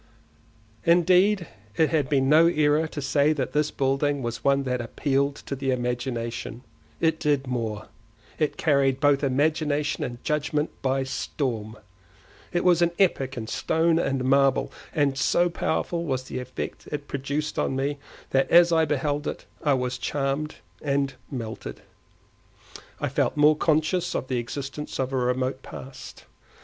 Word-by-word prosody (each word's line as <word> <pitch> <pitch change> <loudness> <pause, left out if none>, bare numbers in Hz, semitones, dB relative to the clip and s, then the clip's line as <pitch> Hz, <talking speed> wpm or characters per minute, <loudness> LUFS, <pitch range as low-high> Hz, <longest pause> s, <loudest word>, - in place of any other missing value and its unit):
Indeed 180 +3 +4 0.3
it 160 - +3
had 150 -5 +1
been 135 -2 +2
no 155 +4 +6
error 155 -1 +2
to 150 - -6
say 145 +2 +3
that 135 -4 -3
this 150 0 +2
building 135 +1 0
was 120 -1 -4
one 140 0 +3
that 125 -2 -1
appealed 140 +3 0
to 140 - -3
the 135 0 -3
imagination; 120 -2 -3 0.4
it 160 -1 +1
did 145 -2 +1
more—it 115 +2 -5
carried 140 -3 +2
both 145 0 +3
imagination 150 +2 +1
and 120 -3 -6
judgement 150 0 0
by 135 0 +1
storm. 115 -5 -3 0.7
It 175 - 0
was 175 -2 +4
an 170 0 +3
epic 135 -9 +1
in 115 - -4
stone 160 +7 +1
and 135 -5 0
marble, 135 0 +3 0.2
and 140 -4 +1
so 175 +5 +2
powerful 170 +1 -1
was 130 -5 -2
the 130 - -5
effect 125 0 -6
it 145 -1 -4
produced 140 +2 -3
on 135 - 0
me, 140 +2 -1 0.3
that 135 0 +2
as 170 0 +7
I 160 -1 +4
beheld 145 0 -1
it - - -5 0.2
I 145 -3 +3
was 125 -1 -2
charmed 140 +4 -2 0.3
and 140 -1 0 0.2
melted. 115 -5 -6 1.2
I - - -1
felt - - 0
more 150 +1 +6
conscious 155 +3 +1
of 130 - -3
the 125 -2 0
existence 140 +4 -5
of 130 0 -1
a - - +1
remote 130 +1 0
past. 130 0 -10
140 Hz, 150 wpm, -25 LUFS, 130-155 Hz, 1.2 s, as